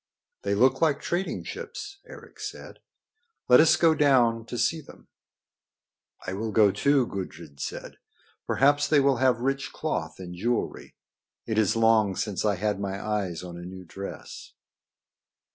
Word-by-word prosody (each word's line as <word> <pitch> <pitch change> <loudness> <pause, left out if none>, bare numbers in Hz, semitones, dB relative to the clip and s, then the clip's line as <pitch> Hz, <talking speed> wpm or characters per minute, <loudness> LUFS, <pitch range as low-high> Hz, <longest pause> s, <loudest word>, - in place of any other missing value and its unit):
"They 100 0 -1
look 130 +5 +3
like 155 -4 +3
trading 180 +3 -2
ships," 415 -4 -7
Eric 470 -1 -13
said. - - -8 0.7
"Let 125 - +7
us 155 0 +6
go 165 -1 +4
down 120 -6 +3
to 120 - -5
see 160 +6 +1
them." - - -17 1.2
"I 95 - -3
will 110 +3 -3
go, 105 -1 +5
too," 140 +3 +2
Gudrid 90 -8 -7
said. - - -6 0.5
"Perhaps 145 +1 +3
they 145 0 +4
will 135 -2 +3
have 125 -2 +2
rich 135 +1 -1
cloth 85 - -3
and 90 -2 -8
jewelry. 115 +7 -3 0.5
It 110 -1 0
is 110 -1 +2
long 110 -3 +3
since 95 +1 -2
I 105 -2 +2
had 105 +1 -1
my 100 -1 -3
eyes 100 -5 -3
on 90 -1 -8
a - - -8
new 90 +1 -9
dress." 100 +4 -9
115 Hz, 155 wpm, -26 LUFS, 100-140 Hz, 1.2 s, Let